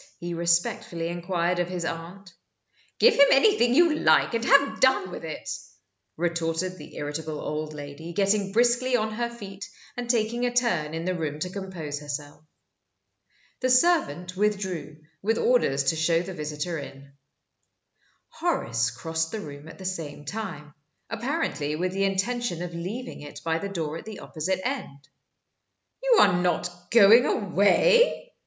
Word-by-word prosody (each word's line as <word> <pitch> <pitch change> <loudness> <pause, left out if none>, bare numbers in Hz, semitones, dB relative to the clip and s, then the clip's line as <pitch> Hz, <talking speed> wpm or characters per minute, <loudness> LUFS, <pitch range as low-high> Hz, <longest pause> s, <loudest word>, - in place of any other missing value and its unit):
he 175 0 -5
respectfully 170 0 0
inquired 175 0 -1
of 175 0 0
his 180 -2 -3
aunt. 175 +3 -7 0.6
"Give 475 - +6
him 280 - +7
anything 260 - +4
you 335 0 +5
like, - - +4
and 230 0 0
have 280 +3 +4
done 260 -8 +3
with - - -7
it!" 160 -1 -7 0.7
retorted 170 +2 -1
the 150 - -12
irritable 150 +1 -4
old 155 0 -4
lady, 145 +3 -8
getting 195 +2 +1
briskly 245 +3 +3
on 215 -2 0
her 235 +2 -2
feet, 200 -5 -9 0.3
and 245 -1 -5
taking 235 0 +1
a 245 - +1
turn 170 -11 +1
in 165 +1 -4
the 185 - 0
room 155 -4 -3
to 180 - -2
compose 180 -7 -5
herself. 145 +1 -7 1.2
The 255 - 0
servant 250 - +2
withdrew, 190 -7 -2 0.2
with 225 +3 +1
orders 235 - +2
to 135 +4 +1
show 165 +1 +2
the 190 +1 -7
visitor 150 +1 -4
in. 140 0 -11 1.2
Horace 115 0 0
crossed 160 +7 -3
the 220 - -4
room 145 -3 -9
at 165 - -11
the 190 - -10
same 160 -6 -5
time 150 -6 -6 0.4
apparently 230 - -2
with 180 +3 -1
the 195 +1 0
intention 195 -1 -1
of 175 -1 -6
leaving 190 +9 -6
it 145 0 -9
by 165 0 0
the 200 - -4
door 165 -5 -3
at - - -10
the 220 -1 -8
opposite 185 +4 -3
end. 155 - -6 0.9
"You - - +4
are - - +6
not 175 0 -2
going 230 +2 +7
away?" 365 - +3
180 Hz, 155 wpm, -26 LUFS, 160-225 Hz, 1.2 s, him